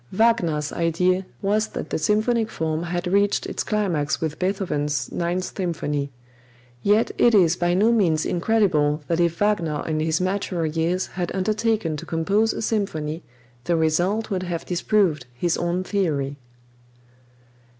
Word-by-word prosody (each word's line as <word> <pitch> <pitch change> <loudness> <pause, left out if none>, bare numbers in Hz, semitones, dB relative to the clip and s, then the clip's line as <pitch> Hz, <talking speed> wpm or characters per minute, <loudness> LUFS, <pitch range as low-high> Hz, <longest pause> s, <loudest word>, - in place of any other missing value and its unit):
Wagner's 180 -9 +1
idea 180 +3 +1 0.2
was 210 +2 +1
that - - -7
the - - 0
symphonic 215 +6 +1
form 160 -3 -2
had 175 +1 -3
reached 200 +3 +2
its - - -3
climax 175 -9 0
with 155 -2 -3
Beethoven's 150 -8 -1
Ninth 175 +2 -2
Symphony; 150 -6 -2 0.7
yet 210 - +3
it 235 -2 +5
is 175 -4 +5
by 175 0 +1
no 215 +5 +4
means 170 -9 +2
incredible 170 -7 +1
that 165 0 0
if 170 -1 +1
Wagner 170 -8 0
in 155 -1 -1
his 160 +1 +1
maturer 185 -2 -1
years 165 +4 0
had 180 -2 -4
undertaken 215 -3 0
to - - -7
compose 200 +7 +1
a - - -4
symphony, 165 -8 -2 0.4
the 175 - +2
result 175 +8 +1
would 185 -2 0
have 175 -2 -4
disproved 180 - +1
his 170 +6 0
own 175 +2 -1
theory. 150 -9 -1
175 Hz, 145 wpm, -23 LUFS, 160-205 Hz, 0.7 s, it